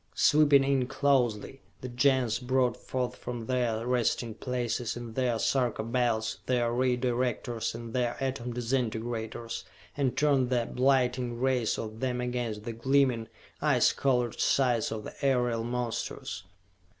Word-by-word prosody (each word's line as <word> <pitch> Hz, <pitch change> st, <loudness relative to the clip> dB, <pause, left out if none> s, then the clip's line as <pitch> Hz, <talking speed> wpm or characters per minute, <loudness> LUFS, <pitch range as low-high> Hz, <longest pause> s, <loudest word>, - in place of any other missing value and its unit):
Sweeping 145 Hz, -2 st, +5 dB
in 135 Hz, -2 st, +1 dB
closely, 135 Hz, -3 st, +1 dB, 0.2 s
the 130 Hz, -, -5 dB
Gens 125 Hz, -2 st, +2 dB
brought 125 Hz, -2 st, +1 dB
forth 125 Hz, -1 st, -3 dB
from 120 Hz, -2 st, -6 dB
their 120 Hz, -3 st, 0 dB
resting 120 Hz, -2 st, 0 dB
places 120 Hz, -1 st, -2 dB
in 120 Hz, -2 st, -7 dB
their 125 Hz, -2 st, +1 dB
Sarka 125 Hz, -2 st, 0 dB
Belts 115 Hz, -2 st, 0 dB
their 120 Hz, -2 st, +1 dB
Ray 125 Hz, 0 st, +2 dB
Directors 120 Hz, -2 st, -1 dB
and 115 Hz, -1 st, -7 dB
their 120 Hz, -2 st, 0 dB
Atom 130 Hz, -2 st, -2 dB
Disintegrators, 115 Hz, -1 st, -3 dB, 0.3 s
and 135 Hz, -3 st, 0 dB
turned 140 Hz, -4 st, +3 dB
the 120 Hz, -2 st, +1 dB
blighting 125 Hz, -2 st, +1 dB
rays 125 Hz, -3 st, +1 dB
of 110 Hz, 0 st, -6 dB
them 125 Hz, -1 st, -1 dB
against 120 Hz, -4 st, -3 dB
the 115 Hz, -, -4 dB
gleaming, 125 Hz, -1 st, +2 dB, 0.3 s
ice -, -, +3 dB
colored 125 Hz, -4 st, 0 dB
sides 125 Hz, -4 st, +2 dB
of 110 Hz, -1 st, -4 dB
the -, -, -8 dB
aerial 125 Hz, -4 st, +2 dB
monsters. 120 Hz, -6 st, -4 dB
125 Hz, 140 wpm, -29 LUFS, 115-130 Hz, 0.3 s, Sweeping